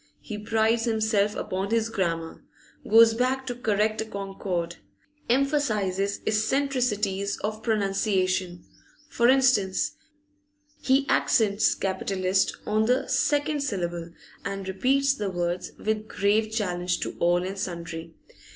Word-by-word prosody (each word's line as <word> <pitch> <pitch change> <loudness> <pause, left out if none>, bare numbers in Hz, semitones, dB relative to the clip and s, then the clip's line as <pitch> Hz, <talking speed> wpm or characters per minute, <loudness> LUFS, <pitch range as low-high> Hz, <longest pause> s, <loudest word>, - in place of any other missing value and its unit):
He 215 - -7
prides 225 +2 +1
himself 220 -2 +1
upon 190 +2 -3
his 225 0 +1
grammar, 165 -6 -3 0.5
goes 225 +1 +7
back 255 +3 0
to 250 - -3
correct 215 -2 0
a - - -3
concord, 195 -4 -4 0.5
emphasises 215 -8 +1
eccentricities 215 -4 0
of 215 +1 -3
pronunciation; 195 -4 0 0.4
for 235 -3 +3
instance, 255 -8 +3 0.9
he 270 +1 +3
accents 220 -4 +2
'capitalist' 190 0 0
on 215 +1 +1
the 250 +2 +1
second 290 +3 +1
syllable, 175 -9 -3 0.3
and 195 -1 -4
repeats 270 +8 +2
the 210 -7 -3
words 175 -1 -2
with 215 0 -2
grave 215 +2 +1
challenge 180 -5 -1
to - - -4
all 175 +1 +2
and 195 +1 -5
sundry. 170 -2 -6
210 Hz, 115 wpm, -26 LUFS, 190-230 Hz, 0.9 s, goes